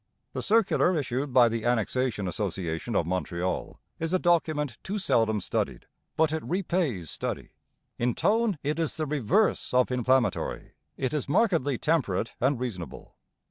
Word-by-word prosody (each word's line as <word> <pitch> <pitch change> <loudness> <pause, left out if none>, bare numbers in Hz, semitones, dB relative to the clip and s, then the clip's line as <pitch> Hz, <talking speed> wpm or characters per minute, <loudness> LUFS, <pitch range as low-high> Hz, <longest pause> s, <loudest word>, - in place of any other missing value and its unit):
The - - -3
circular 200 -5 +3
issued 135 0 -2
by 125 -1 +6
the 115 -1 -2
Annexation 120 -2 0
Association 90 +1 -3
of 85 - +2
Montreal 90 0 -2 0.2
is 165 +2 -2
a - - +5
document 155 -6 +1
too 200 +2 -3
seldom 115 - +2
studied, - - -2 0.3
but 160 -1 +3
it 160 - -1
repays 170 - -1
study. - - -4 0.5
In 120 0 +1
tone 220 -3 +2
it 150 +3 -1
is 165 -3 -1
the 155 - -1
reverse 150 - +1
of 125 0 +3
inflammatory; 125 -3 +1 0.3
it 130 - -1
is 145 -3 -2
markedly 150 - +2
temperate 115 - 0
and 130 0 +2
reasonable. 95 - -6
130 Hz, 145 wpm, -27 LUFS, 110-160 Hz, 0.5 s, by